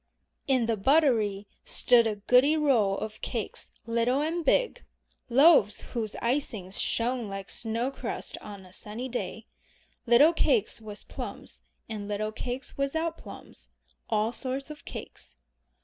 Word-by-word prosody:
In 260 -4 +3
the 225 -1 0
buttery 220 -5 +3 0.2
stood 235 -2 +4
a 215 - -1
goodly 250 +9 +4
row 240 -10 +3
of 215 +1 -5
cakes 225 -5 -3 0.2
little 235 +3 +1
and 330 +3 -1
big, - - +2 0.5
loaves 265 - +6
whose 225 -4 -2
icings 230 -7 -1
shone 235 -1 0
like 195 -1 -5
snow 230 +3 +1
crust - - -4
on 200 -2 -10
a 180 - -16
sunny 215 +6 -5
day, 245 - -4 0.6
little 275 +8 +6
cakes 240 -9 +2
with 210 -1 -8
plums - - -7 0.3
and 210 -2 -5
little 210 +1 -2
cakes 245 +4 -4
without 320 +4 0
plums; - - -9 0.4
all 215 0 +1
sorts 265 +3 -3
of 300 - -11
cakes. - - -7
235 Hz, 135 wpm, -28 LUFS, 210-275 Hz, 0.6 s, loaves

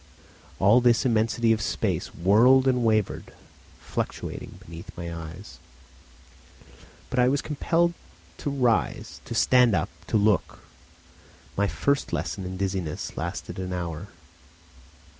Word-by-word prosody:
All 105 +6 +5
this 120 0 +3
immensity 115 -1 +2
of 110 - -2
space 90 -8 -1
whirled 120 +9 +5
and 125 -2 +2
wavered, 110 -3 0 0.4
fluctuating - - -5
beneath 85 +1 -10
my 85 -1 -5
eyes. 85 +4 -9 1.5
But 130 - 0
I 125 - +5
was 140 +2 0
compelled 170 +3 +1 0.5
to - - -2
rise, 125 -5 0
to - - -5
stand 125 -4 +5
up, 85 - 0 0.2
to 110 - +2
look. 105 -2 +1 0.9
My 100 +1 +2
first 140 +6 0
lesson 95 - -3
in 95 0 -5
dizziness 95 -5 -3
lasted - - -5
an 90 -1 -4
hour. 85 -3 -4
110 Hz, 120 wpm, -26 LUFS, 90-125 Hz, 1.5 s, All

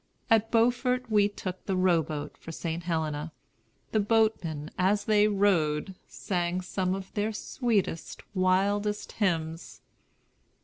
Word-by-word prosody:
At 225 0 +4
Beaufort 245 +1 +2
we 205 -1 +4
took 185 -2 -6
the 190 - 0
row 185 -3 +4
boat 150 -1 -5
for 165 - -10
St. 165 +1 -4
Helena. 160 -2 -2 0.6
The 215 - +2
boatmen 205 -8 +1
as 195 +3 +1
they 210 -1 +4
rowed 190 -5 +1
sang 180 -1 -2
some 185 0 -1
of 195 -1 -8
their 210 +1 0
sweetest, 215 -5 -2
wildest 200 +3 +1
hymns. 165 -5 -2
190 Hz, 125 wpm, -28 LUFS, 170-210 Hz, 0.6 s, At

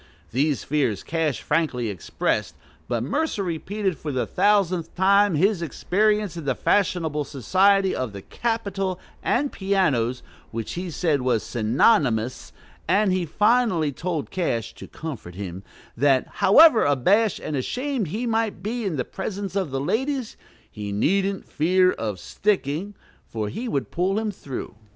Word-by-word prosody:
These 140 +4 +1
fears 130 -9 0
Cash 160 -4 -1
frankly 125 -9 0
expressed; 95 -5 -2 0.3
but 120 -2 -1
Mercer 285 - -1
repeated 185 +1 -2
for 150 - -4
the 130 -2 -1
thousandth 185 -4 +1
time 200 0 +4
his 190 +3 +2
experience 205 +4 0
in 165 -3 -6
the 135 -2 0
fashionable 165 -7 +1
society 190 - +2
of 130 -4 -3
the 100 -1 -9
"Capitol, 200 -5 -2 0.2
and 280 +3 +1
pianos," 150 - 0 0.3
which 115 -1 -5
he 180 +1 -4
said 155 -4 0
"was 125 -3 +1
synonymous;" 120 - +1 0.4
and 195 +3 +3
he 180 -2 -1
finally 210 -4 +2
told 165 +2 -4
Cash, 115 - -2
to - - -11
comfort 130 - -7
him, 95 -2 -6 0.3
that, 135 +1 +3 0.2
however 265 +4 +7
abashed 190 - +3
and 155 - -4
ashamed 250 - -2
he 215 +10 -3
might 225 -5 -1
be 230 +2 -3
in 185 -5 -1
the 125 - -2
presence 195 0 -5
of 190 -6 0
the 135 0 -2
ladies, 255 - -1 0.4
"he 105 -1 -6
needn't 195 - 0
fear 185 +4 +3
of 105 - -4
sticking, 195 - -1 0.3
for 110 -2 -3
he 235 - -5
would 140 - -2
pull 185 +3 0
him 220 -1 -1
through." 140 -9 -7
175 Hz, 145 wpm, -24 LUFS, 135-200 Hz, 0.4 s, however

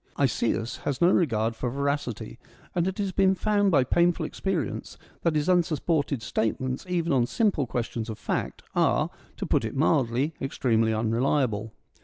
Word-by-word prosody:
Isaeus 115 -3 0
has 140 -2 -3
no 175 +2 +5
regard 115 - +1
for 125 - -2
veracity, 140 -3 -3 0.3
and 175 0 +1
it 190 - -3
has 200 -2 -1
been 190 0 +3
found 205 0 +2
by 145 -8 +4
painful 170 +6 +2
experience 175 - -3 0.2
that 165 -2 +1
his 150 +1 +1
unsupported 160 -6 +1
state 110 +2 -1
ments, 130 +6 -4
even 170 -3 0
on 120 -3 +3
simple 190 - +1
questions 115 -1 -3
of 110 - -5
fact, - - -3
are, - - +2 0.3
to - - -3
put - - +1
it 110 - -4
mildly, 135 -1 +2
extremely 115 -4 +1
unreliable. 115 0 0
140 Hz, 160 wpm, -26 LUFS, 115-170 Hz, 0.3 s, no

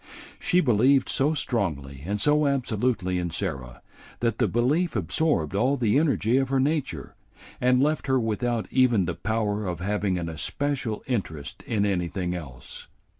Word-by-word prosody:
She 180 -4 +3
believed 130 - +3
so 150 +4 +2
strongly 75 - -2
and 105 +1 -1
so 150 +4 +3
absolutely 115 -8 0
in 90 -1 -2
Sarah 65 -6 -4 0.4
that 115 -2 -1
the 120 - +3
belief 135 - +1
absorbed 100 - +1
all 125 +8 +2
the 120 +1 +2
energy 135 -6 +2
of 135 -1 +1
her 135 0 +1
nature 135 - -1 0.5
and 125 +1 +4
left 155 0 0
her 130 -1 +3
without 115 0 -1
even 120 -7 +3
the 85 - -2
power 105 +2 -1
of 90 -3 -3
having 100 0 -1
an 85 -2 -3
especial 115 - -2
interest 80 - -4
in 105 -3 +1
anything 90 -2 -1
else. 70 -8 -8
110 Hz, 155 wpm, -26 LUFS, 90-135 Hz, 0.5 s, and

